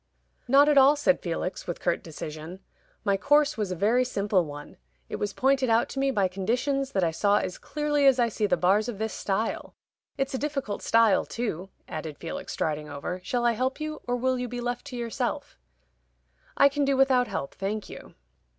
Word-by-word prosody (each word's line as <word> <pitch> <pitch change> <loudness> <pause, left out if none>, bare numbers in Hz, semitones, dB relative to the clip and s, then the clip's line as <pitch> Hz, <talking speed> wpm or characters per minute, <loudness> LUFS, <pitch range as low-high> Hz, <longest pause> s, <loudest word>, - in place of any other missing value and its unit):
"Not 275 +3 +6
at 295 -2 +6
all," 275 +2 +6
said 290 -2 +2
Felix, 175 +1 -4
with 175 - -4
curt 175 - 0
decision. 160 +3 -8 0.4
"My 200 -2 +2
course 290 +6 +3
was 210 -4 -2
a - - -2
very 225 +8 +3
simple 200 -6 +1
one. 145 0 -10 0.3
It - - -4
was 205 - -2
pointed 265 +2 +2
out 225 +1 +3
to 270 - -5
me 275 0 +2
by 205 -7 +2
conditions 255 +9 -1
that 190 - +1
I 165 - +2
saw 200 +5 +2
as 185 - -3
clearly 295 -2 +1
as 265 -2 +6
I 240 -2 +3
see 215 -1 -1
the - - +2
bars 200 +6 +2
of 225 - -5
this 220 +1 -3
stile. 210 +3 -2 0.4
It's 270 0 -1
a 260 - -1
difficult 280 -8 -3
stile 225 -4 +4
too," 195 -6 -4 0.2
added 155 -2 -6
Felix, 165 - -6
striding 150 -1 -2
over. 155 +6 -5
"Shall 240 +3 -1
I 240 - +5
help 255 +5 -1
you, 310 0 -5
or 245 - +1
will 255 +1 0
you 250 - -2
be 245 +1 -5
left 245 +2 -3
to 265 - -7
yourself?" 235 -2 -3 1.0
"I 280 - +7
can 285 +1 0
do 275 -1 +2
without 260 -2 +4
help, 140 - -4
thank 205 +2 -4
you." - - -11
230 Hz, 205 wpm, -27 LUFS, 190-270 Hz, 1.0 s, I